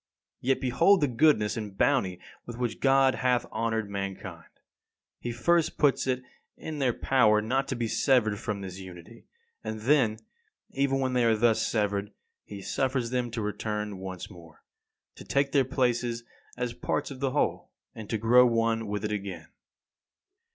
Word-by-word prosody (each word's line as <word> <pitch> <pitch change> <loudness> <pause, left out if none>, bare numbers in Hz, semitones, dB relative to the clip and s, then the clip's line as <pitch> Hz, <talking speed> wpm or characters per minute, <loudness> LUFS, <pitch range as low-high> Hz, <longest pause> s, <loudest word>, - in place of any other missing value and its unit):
Yet 130 +1 +1
behold 165 +10 +4
the 145 - +3
goodness 120 -5 +3
and 105 -3 -6
bounty 100 -11 +1 0.3
with 120 -1 -7
which 120 -2 -2
God 135 -1 +4
hath 125 -1 +1
honoured 110 -1 -1
mankind. 95 -4 -6 0.7
He 120 - -4
first 170 +7 +1
puts 140 -2 +2
it 130 -1 0 0.3
in 155 -2 -6
their 130 -3 +2
power 115 -4 +3
not 130 +6 0
to 130 - -2
be 120 -1 -2
severed 110 -4 +2
from 105 -3 -4
this 95 -1 -7
unity; 95 +4 -12 0.4
and 110 0 -5
then, 120 -3 +3 0.5
even 135 0 0
when 130 -1 0
they 125 -1 +2
are 115 -1 +3
thus 115 0 +2
severed, 105 -2 -1 0.3
he 100 -2 -9
suffers 130 -1 -1
them 125 -1 -1
to 115 -1 -4
return 105 -1 -3
once 95 -1 -6
more, 85 -4 -15 0.5
to - - -10
take 140 0 0
their 140 -2 +4
places 120 -3 0 0.3
as 125 -1 -2
parts - - -2
of 135 - -8
the 135 0 0
whole, 145 +3 -1 0.2
and 110 -2 -9
to 115 - 0
grow 120 +3 +6
one 115 -1 0
with 105 0 -3
it 105 - -2
again. 95 -6 -5
115 Hz, 165 wpm, -28 LUFS, 105-130 Hz, 0.7 s, grow